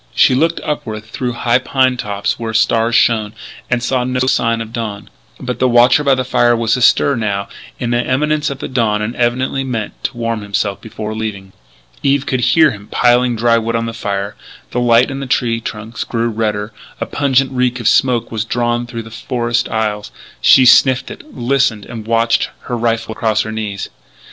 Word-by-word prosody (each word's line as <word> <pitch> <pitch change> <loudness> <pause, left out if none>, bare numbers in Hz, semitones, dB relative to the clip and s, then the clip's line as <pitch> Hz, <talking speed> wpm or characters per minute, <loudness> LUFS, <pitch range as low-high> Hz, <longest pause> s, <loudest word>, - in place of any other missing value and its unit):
She - - +5
looked 165 +6 +1
upward 110 -8 -4
through 120 +3 -4
high 120 +1 +1
pine 130 0 +1
tops 105 +1 -3
where 110 -1 -4
stars 115 +1 +2
shone; 110 -3 +2 0.4
and 120 -1 0
saw 125 0 0
no 125 0 -1
sign 115 -3 +1
of 115 0 -7
dawn. 110 -4 -5 0.3
But 125 -1 -4
the 130 - +3
watcher 120 +4 +5
by 140 -2 +4
the 130 - -1
fire 120 -1 +2
beyond 115 - -1
was 115 +1 +2
astir, 130 +3 +3
now, 100 -3 -2 0.3
in 120 -1 -2
the 120 +1 +1
imminence 150 +4 0
of 140 - -5 0.2
dawn, 105 -4 +1
and 115 +3 -4
evidently 130 +3 0
meant 115 -5 -5
to 125 - -3
warm 115 -2 -2
himself 100 0 -2
before 110 -1 -6
leaving. 105 -3 -5 0.5
Eve 140 0 +1
could 130 -2 -1
hear 155 +4 +4
him 105 -2 -10
piling 120 0 +2
dry 115 +1 +3
wood 115 0 -2
on 115 0 -1
the 115 - -4
fire; 100 -2 -3 0.4
the 125 - -1
light 120 +2 +4
on 135 - -5
the 135 - -5
tree 115 -3 0
trunks 110 0 -6
grew 115 0 -1
redder; 105 -1 -2 0.3
a - - -2
pungent 135 -2 +1
reek 125 -1 0
of 115 - -1
smoke 120 -3 +2
was 110 -2 -2
drawn 120 +1 -1
through 115 -2 -6
the 115 - -12
forest 120 +1 -2
aisles. 105 -2 -2 0.3
She 130 - +6
sniffed 130 +1 +5
it, - - -12
listened, 125 -4 +1
and 115 -2 -8
watched, 115 0 +2
her 120 - -4
rifle 115 -1 -1
across 110 0 0
her 110 - -6
knees. 105 -3 -5
115 Hz, 195 wpm, -16 LUFS, 110-125 Hz, 0.5 s, She